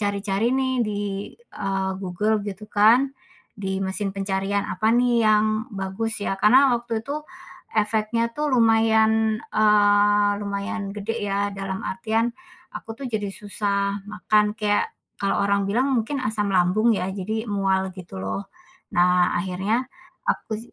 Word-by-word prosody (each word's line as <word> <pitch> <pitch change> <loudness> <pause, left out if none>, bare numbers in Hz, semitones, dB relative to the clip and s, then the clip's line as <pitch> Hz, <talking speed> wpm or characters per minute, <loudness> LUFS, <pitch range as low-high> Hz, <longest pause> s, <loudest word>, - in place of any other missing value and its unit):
cari-cari 205 +3 0
nih, 260 -1 +1
di, 205 -1 -3 0.3
eee, 195 - -3
Google 200 +3 -1
gitu 210 +1 -7
kan, 225 +6 +5 0.5
di 190 -1 -3
mesin 195 +1 -2
pencarian. 195 +1 -1
Apa 215 +5 +1
nih 240 -1 +3
yang 215 0 +4 0.3
bagus 200 +3 -3
ya, 195 - -2
karena 255 +7 +5
waktu 230 -1 -3
itu 300 +2 -4 0.5
efeknya 220 +2 +1
tuh 295 -2 -1
lumayan, 220 -1 +3
eee, 205 -1 +4
lumayan 200 0 -4
gede 215 +1 -3
ya, 200 0 0
dalam 195 -1 -4
artian 220 +5 -1 0.4
aku 225 - -8
tuh - - -2
jadi 210 -3 -2
susah 200 -1 -2
makan, 210 0 +1
kayak 205 -1 0 0.3
kalau 195 0 +1
orang 200 0 +1
bilang 250 +7 +1
mungkin 260 +5 -1
asam 210 -4 -1
lambung 190 +6 +3
ya, 190 -3 -1
jadi 215 +4 -4
mual, 190 -2 0
gitu 170 - -8
loh. 100 - -3 0.5
Nah, 180 0 +4
akhirnya 195 +7 -1 0.4
aku 220 - -1
205 Hz, 135 wpm, -23 LUFS, 195-225 Hz, 0.5 s, kan